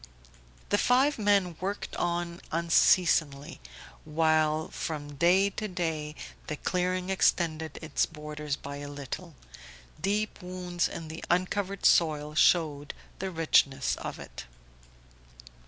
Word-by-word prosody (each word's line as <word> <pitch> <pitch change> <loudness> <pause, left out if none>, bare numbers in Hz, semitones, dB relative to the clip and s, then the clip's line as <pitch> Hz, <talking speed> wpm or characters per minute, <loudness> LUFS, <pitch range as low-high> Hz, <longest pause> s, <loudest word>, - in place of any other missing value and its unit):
The 205 - +2
five 265 +2 +3
men 200 -5 +2
worked 200 +2 -4
on 175 0 -2
unceasingly, 165 - +2 0.4
while 155 0 +2
from 145 -2 -5
day 180 +7 +3
to 215 +2 -4
day 160 -5 -3 0.3
the 150 - -3
clearing 180 +3 -1
extended 160 -4 +1
its 155 - 0
borders 150 -2 -5
by 140 0 -8
a 145 0 -7
little; 145 +4 -7 0.7
deep 210 +4 -1
wounds 180 -1 -2
in 165 - -7
the 160 +1 -8
uncovered 190 +2 0
soil 150 -2 +3
showed 150 -3 +2 0.2
the 190 - -2
richness 150 -5 +2
of - - -6
it. - - -10
170 Hz, 115 wpm, -29 LUFS, 150-185 Hz, 0.7 s, five